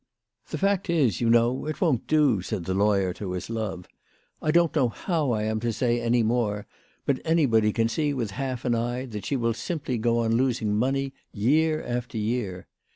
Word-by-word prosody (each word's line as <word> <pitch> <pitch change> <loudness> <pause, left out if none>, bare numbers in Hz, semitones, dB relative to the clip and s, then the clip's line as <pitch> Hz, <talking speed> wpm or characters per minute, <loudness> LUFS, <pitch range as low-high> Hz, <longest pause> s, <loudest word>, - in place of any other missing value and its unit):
" - - -37
The - - -3
fact 195 -1 0
is, 140 - +2
you 115 - +2
know, 120 +4 +3
it 155 - -4
won't 155 - +1
do," 145 -10 +3
said 95 -2 -4
the 95 - -1
law 100 +2 +3
yer 95 -2 0
to 95 -1 -5
his 90 +5 -5
love. 105 -6 -4 0.3
" - - -40
I 155 - -1
don't 170 0 +3
know 130 -5 +3
how 160 - -1
I 110 -3 0
am 110 0 -1
to 120 +1 -1
say 120 +1 0
any 120 0 +2
more, 110 -3 0 0.4
but 135 -2 0
anybody 125 -10 +3
can 115 +1 +1
see 145 +5 0
with 120 -7 -2
half 130 +2 -4
an 120 - +2
eye 120 +2 -1
that 105 -5 -6
she 140 - 0
will 115 -2 +1
simply 135 -2 -3
go 115 +1 +2
on 115 -1 +1
losing 120 -4 +1
money 135 +4 0 0.2
year 155 +8 +2
after 120 -1 -4
year. 105 -4 -2
120 Hz, 215 wpm, -26 LUFS, 110-135 Hz, 0.4 s, know